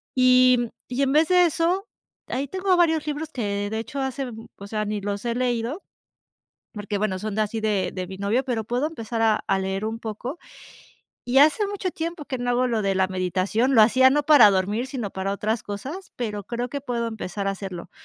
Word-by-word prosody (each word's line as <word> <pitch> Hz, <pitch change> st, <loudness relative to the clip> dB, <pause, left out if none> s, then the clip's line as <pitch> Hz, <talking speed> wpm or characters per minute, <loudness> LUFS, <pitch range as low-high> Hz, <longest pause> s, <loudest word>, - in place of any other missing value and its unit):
y 255 Hz, -1 st, +5 dB, 0.2 s
y 250 Hz, +2 st, -2 dB
en 270 Hz, -1 st, +2 dB
vez 310 Hz, +2 st, +4 dB
de 360 Hz, -1 st, +6 dB
eso, 345 Hz, +4 st, 0 dB, 0.4 s
ahí 275 Hz, +2 st, -2 dB
tengo 375 Hz, +4 st, +1 dB
varios 320 Hz, -3 st, +2 dB
libros 300 Hz, +1 st, -3 dB
que 205 Hz, -4 st, -2 dB
de 220 Hz, +1 st, -2 dB
hecho 270 Hz, +5 st, -5 dB
hace 265 Hz, -1 st, -3 dB, 0.3 s
o 200 Hz, -, -9 dB
sea, 215 Hz, 0 st, -2 dB
ni 210 Hz, 0 st, -3 dB
los 200 Hz, 0 st, -3 dB
he 235 Hz, -1 st, -1 dB
leído. 245 Hz, +6 st, -1 dB, 0.9 s
Porque 205 Hz, -1 st, -4 dB
bueno, 195 Hz, -2 st, -1 dB
son 215 Hz, +1 st, -4 dB
de 215 Hz, -, +1 dB
así 215 Hz, +1 st, -2 dB
de 210 Hz, -3 st, 0 dB
de 185 Hz, -1 st, -4 dB
mi 190 Hz, +1 st, -8 dB
novio, 210 Hz, +7 st, 0 dB
pero 240 Hz, -4 st, -1 dB
puedo 245 Hz, +7 st, -1 dB
empezar 230 Hz, -7 st, -4 dB
a 220 Hz, -1 st, +2 dB
a 195 Hz, -, +2 dB
leer 190 Hz, +2 st, -2 dB
un 225 Hz, +1 st, -3 dB
poco. 235 Hz, -, -6 dB, 0.9 s
Y 250 Hz, +2 st, +3 dB
hace 310 Hz, +9 st, +5 dB
mucho 400 Hz, -2 st, -3 dB
tiempo 330 Hz, -2 st, -5 dB
que 260 Hz, -, -4 dB
no 245 Hz, 0 st, -3 dB
hago 245 Hz, +1 st, +2 dB
lo 225 Hz, -2 st, 0 dB
de 195 Hz, -1 st, +1 dB
la 190 Hz, 0 st, +2 dB
meditación. 185 Hz, +7 st, 0 dB
Lo 220 Hz, -, +8 dB
hacía 260 Hz, +4 st, +6 dB
no 295 Hz, +2 st, +2 dB
para 290 Hz, -9 st, +7 dB
dormir, 205 Hz, +6 st, 0 dB
sino 250 Hz, -7 st, -4 dB
para 190 Hz, +1 st, -3 dB
otras 215 Hz, +3 st, -1 dB
cosas, 275 Hz, -, -7 dB
pero 210 Hz, -4 st, -4 dB
creo 240 Hz, +3 st, -3 dB
que 280 Hz, +1 st, -4 dB
puedo 240 Hz, -3 st, -2 dB
empezar 205 Hz, -3 st, -5 dB
a -, -, +2 dB
hacerlo, 190 Hz, -3 st, -7 dB
235 Hz, 215 wpm, -24 LUFS, 205-275 Hz, 0.9 s, Lo